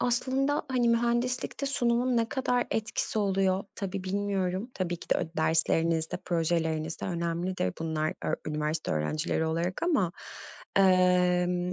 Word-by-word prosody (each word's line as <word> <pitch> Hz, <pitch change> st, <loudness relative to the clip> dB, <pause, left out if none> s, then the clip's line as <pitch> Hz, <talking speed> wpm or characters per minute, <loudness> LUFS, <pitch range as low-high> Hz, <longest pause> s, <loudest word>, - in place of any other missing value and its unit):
aslında, 265 Hz, +4 st, +1 dB
hani, 245 Hz, -2 st, +2 dB
mühendislikte 240 Hz, +3 st, 0 dB
sunumun 245 Hz, -2 st, +1 dB
ne 230 Hz, 0 st, +2 dB
kadar 250 Hz, -2 st, 0 dB
etkisi 220 Hz, 0 st, -1 dB
oluyor? 195 Hz, -1 st, +1 dB
Tabii 195 Hz, -1 st, -4 dB
bilmiyorum. 195 Hz, +2 st, -1 dB
Tabii 175 Hz, -2 st, -2 dB
ki -, -, -13 dB
de -, -, +5 dB
öd -, -, -3 dB
derslerinizde, 160 Hz, 0 st, +2 dB
projelerinizde 165 Hz, -2 st, -1 dB
önemlidir. 170 Hz, -, -1 dB
Bunlar 160 Hz, -1 st, -1 dB
öğ -, -, +1 dB
üniversite 150 Hz, +1 st, -2 dB
öğrencileri 155 Hz, -, 0 dB
olarak 170 Hz, +3 st, -2 dB
ama, 270 Hz, -, +2 dB, 0.6 s
emm, 180 Hz, -1 st, +3 dB
185 Hz, 125 wpm, -29 LUFS, 165-235 Hz, 0.6 s, de